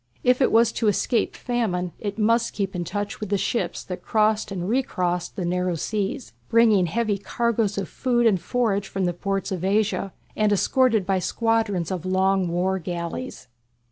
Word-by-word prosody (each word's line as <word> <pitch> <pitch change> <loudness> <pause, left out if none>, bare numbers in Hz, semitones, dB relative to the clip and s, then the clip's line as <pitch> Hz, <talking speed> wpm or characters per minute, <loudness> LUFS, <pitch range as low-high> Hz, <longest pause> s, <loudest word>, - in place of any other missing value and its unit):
If 250 +2 +3
it - - +4
was 230 0 +5
to 225 - -1
escape 215 +3 +1
famine 200 -8 -1
it 205 -1 -4
must 230 +2 +2
keep 195 -2 -3
in 175 - -2
touch 205 +3 -4
with 215 - -5
the 200 - +2
ships 235 - -2
that 180 - -6
crossed 215 -1 +1
and 180 -2 -3
recrossed 180 -8 -1
the 185 - -3
narrow 180 0 0
seas, 205 - -3 0.2
bringing 220 -5 +4
heavy 210 +2 0
cargoes 225 -1 0
of 195 -2 -2
food 240 -2 0
and 195 -6 +3
forage 205 -1 0
from 195 -1 -2
the 175 - 0
ports 195 +2 -2
of 185 -2 -3
Asia, 200 0 +1 0.2
and 215 -1 +2
escorted 225 0 +2
by 190 0 +1
squadrons 215 -2 0
of 185 -3 -3
long 190 0 +2
war 180 +3 0
galleys. 170 - -5
200 Hz, 175 wpm, -24 LUFS, 185-225 Hz, 0.2 s, was